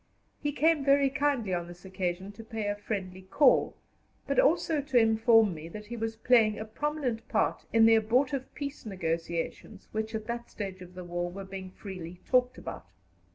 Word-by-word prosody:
He 290 - 0
came 310 0 +2
very 275 0 +4
kindly 275 -8 0
on 175 -1 -2
this 175 +1 -12
occasion 185 0 -3
to 215 +2 -11
pay 220 -1 -4
a 205 0 0
friendly 190 -3 -5
call, 245 +8 +3 0.5
but - - +1
also 325 -11 +3
to 275 -3 0
inform 225 -2 +5
me 160 +1 -8
that 210 +4 -8
he 235 +3 -6
was 225 -1 -3
playing 225 -2 +4
a 215 - -5
prominent 255 -1 -3
part - - 0
in 225 -1 +6
the 225 - +7
abortive 250 +5 +1
peace 285 0 -5
negotiations 170 -4 -4
which 220 +1 -3
at 220 -1 -4
that 235 +1 -5
stage 195 -3 -6
of 180 0 -12
the 180 - -7
war 175 0 -3
were 195 +2 -7
being 190 -1 -7
freely 180 -3 -8
talked 250 0 +2
about. - - -8
220 Hz, 185 wpm, -29 LUFS, 185-250 Hz, 0.5 s, the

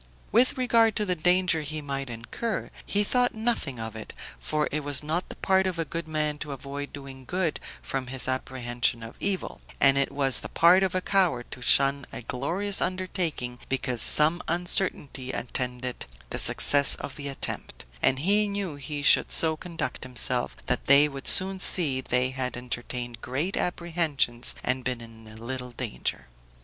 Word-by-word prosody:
With 245 +4 +3
regard 230 -3 +3
to 210 - 0
the 185 - +1
danger 180 0 +2
he 155 +1 -5
might 135 -2 -5
incur, 120 - -4 0.2
he 205 +1 +1
thought 245 +3 +1
nothing 220 - -1
of 110 0 -6
it; 110 - -8 0.3
for 155 -1 -1
it 150 0 -2
was 145 0 +2
not 160 +4 -2
the - - -6
part 190 0 +2
of 185 -2 -3
a 165 - -1
good 165 0 -5
man 150 -1 -2
to 145 -1 -5
avoid 140 +1 -7
doing 135 -2 -10
good 175 +2 -2 0.2
from 135 -2 -3
his 130 0 -1
apprehension 120 -3 -1
of 115 - -9
evil, 195 -2 -3 0.2
and 135 0 +5
it 140 - 0
was 135 -2 +3
the - - -8
part 175 +3 +5
of 190 -1 0
a 185 - +1
coward 180 -12 +1
to 125 - -7
shun 140 +2 +4
a - - -7
glorious 180 - 0
undertaking 175 -9 -3
because 130 -2 -1
some 160 +4 +4
uncertainty 170 -6 -2
attended 125 0 -3 0.3
the - - 0
success 140 -1 +5
of 135 - -7
the 145 -1 -6
attempt; 135 - -2 0.2
and 130 - +3
he 205 +5 +3
knew 200 -7 -4
he 145 +1 -5
should - - +5
so 160 -1 +4
conduct 165 -1 -5
himself, 125 0 +1
that 125 - -1
they 140 +2 +7
would 140 -2 -8
soon 190 0 +2
see 150 -8 +4
they 125 0 +1
had 130 -1 -3
entertained 120 -1 -5
great 145 +10 -2
apprehensions 165 -9 0
and 130 0 -1
been 125 -1 -2
in 115 -1 -13
little 125 +3 -5
danger. - - -3
145 Hz, 175 wpm, -26 LUFS, 125-180 Hz, 0.3 s, they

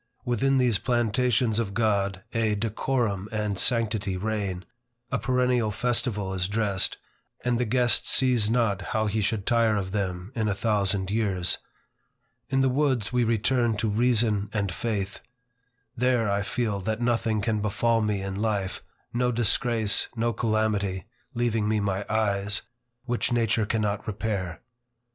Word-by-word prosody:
Within 135 +3 +2
these 125 -5 +3
plantations 120 -1 +1
of 100 -4 -2
God, 100 -4 0
a 110 -2 +1
decorum 110 -1 -1
and 105 -3 -2
sanctity 110 -5 +1
reign, 100 -2 -3 0.5
a - - 0
perennial 125 -3 +1
festival 105 -3 -1
is 90 -1 0
dressed, 100 -2 0 0.5
and 120 -1 +1
the 125 - +1
guest 120 +1 +2
sees 125 -5 +3
not 115 -5 +1 0.2
how 110 - +1
he 110 +1 0
should 105 -1 -1
tire 115 -2 +3
of 95 -2 -3
them 95 -1 -3
in 110 -4 -1
a 100 - 0
thousand 100 -3 0
years. 100 -5 0 0.9
In 135 0 +2
the 135 - +3
woods, 130 -4 +1
we 125 -1 +3
return 115 0 +1
to 110 +1 0
reason 110 -2 +2
and 100 -3 -1
faith. 100 -3 -3 0.8
There 120 -3 +2
I 100 0 +1
feel 105 0 -1
that 110 +3 -2
nothing 115 -2 +1
can 105 0 0
befall 115 +3 +1
me 105 -2 -1
in 95 0 -4
life, 100 -2 -2 0.3
no 125 +1 +1
disgrace, 115 -1 +2
no 115 0 0
calamity, 105 -5 0 0.3
(leaving 115 -3 0
me 110 0 +1
my 100 0 -2
eyes,) 105 -2 0 0.4
which 120 -1 -1
nature 115 -2 +1
cannot 105 -2 -1
repair. 100 -5 -3
110 Hz, 145 wpm, -26 LUFS, 100-120 Hz, 0.9 s, these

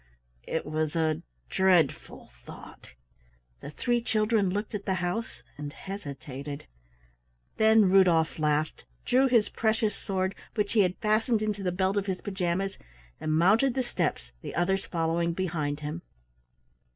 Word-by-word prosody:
It 160 - -2
was 155 +1 -2
a 160 -2 +1 0.3
dreadful 180 - +1
thought. 65 - -12 0.6
The - - -8
three 240 +9 0
children 215 -3 +1
looked 205 +4 -3
at 200 -1 -5
the 190 - +1
house 180 +6 -3 0.2
and 145 -1 -5
hesitated. 145 -6 -7 0.9
Then 220 -1 +6
Rudolf 180 -5 +4
laughed, 150 0 0 0.2
drew 260 +2 +4
his 235 -5 +3
precious 220 -2 0
sword, 190 -1 -2 0.2
which 210 -2 0
he 225 - +3
had 185 -2 +3
fastened 215 +1 +1
into 210 -2 -2
the 185 -2 0
belt 190 +2 0
of 200 0 -1
his 185 -1 -2
pajamas, 190 0 -2 0.4
and 155 - -2
mounted 210 +11 +4
the 260 - +1
steps, - - -2
the - - -7
others 190 +3 0
following 170 0 0
behind 155 -5 -2
him. 155 +3 -4
190 Hz, 140 wpm, -28 LUFS, 160-210 Hz, 0.9 s, Then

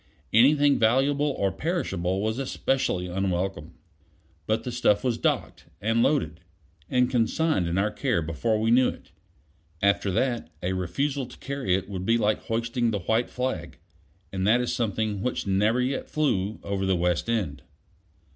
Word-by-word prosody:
Anything 140 +5 +5
valuable 135 +6 +3
or 100 -1 +1
perishable 95 - -2
was 110 +3 -1
especially 135 -7 -1
unwelcome. 90 -3 -2 0.7
But 110 +1 0
the 125 - -4
stuff 110 -3 +2
was 120 -3 0
docked, - - -1
and 115 +3 +1
loaded, 85 - +1 0.5
and 125 -1 +3
consigned 125 - +1
in 85 +2 -1
our 105 +2 +1
care 120 - 0
before 105 +8 -1
we 110 +1 +1
knew 125 +1 +5
it. - - -11 0.7
After 100 +1 +2
that, 120 +1 0
a 90 +1 0
refusal 135 - -2
to 125 - -13
carry 135 -10 -1
it 95 0 -3
would 95 -2 -5
be 115 +1 +4
like 105 -2 +1
hoisting 115 +1 0
the 105 -3 -2
white 110 +6 0
flag; 125 -10 -3 0.6
and 95 0 -1
that 115 +3 +5
is 125 - -1
something 110 -3 -1
which 125 +4 -2
never 105 +5 +2
yet 130 +2 -1
flew 110 -9 0
over 95 -1 -2
the 95 - +3
West 90 +4 0
End. 90 - -1
110 Hz, 160 wpm, -26 LUFS, 95-125 Hz, 0.7 s, Anything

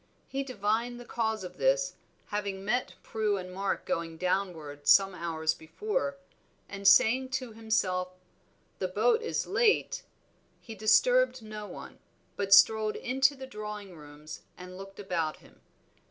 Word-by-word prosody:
He 275 - -3
divined 240 -1 -1
the 245 - -10
cause 220 -3 -2
of 180 - -9
this, - - +2 0.4
having 200 -2 -3
met 245 +4 -1
Prue 215 -2 0
and 185 -1 -7
Mark 195 +1 -2
going 165 -1 -3
downward 165 -5 -2
some 195 -1 +6
hours 160 -2 -1
before, 350 - -3 0.5
and 200 0 -2
saying 255 +5 +5
to 255 -3 -8
himself, 185 -5 -1 0.6
"The 185 - 0
boat 220 - +2
is 460 - -2
late," 465 -4 +2 0.6
he 225 - -10
disturbed 260 - +3
no 215 -1 -7
one, - - -10 0.4
but 200 -1 -3
strolled 215 +3 +6
into 265 +3 +2
the 265 -1 -8
drawing 210 -5 -7
rooms 150 0 -11 0.2
and 180 0 -10
looked 195 +1 -10
about 170 -6 -2
him. - - -21
210 Hz, 140 wpm, -29 LUFS, 185-245 Hz, 0.6 s, some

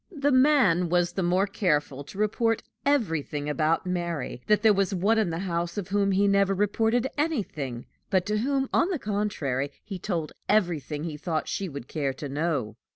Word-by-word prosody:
The 290 -4 0
man 255 - +4
was 175 0 +2
the 190 - -1
more 180 +2 +2
careful 150 -8 0
to 190 - -11
report 225 +2 +1 0.2
everything 165 - 0
about 155 +4 +1
Mary, 170 -8 -3
that 210 0 +3
there 220 -1 +6
was 195 0 +1
one 210 +5 +2
in 210 -5 +1
the 165 - -3
house 170 0 -2
of 200 -2 -4
whom 200 0 +2
he 200 +1 +3
never 200 0 +3
reported 225 +4 +1
anything, 160 - -2 0.2
but 185 -2 +2
to 210 +1 0
whom, 270 +3 0
on 345 - +3
the 365 - 0
contrary, 200 - -2
he 195 -3 -6
told 170 -5 -2 0.2
everything 165 - +1
he 160 -3 -4
thought 160 0 -2
she 195 -2 -3
would 140 -4 -8
care 140 -3 -2
to 145 +2 -6
know. 140 -7 -2
185 Hz, 185 wpm, -27 LUFS, 155-210 Hz, 0.2 s, there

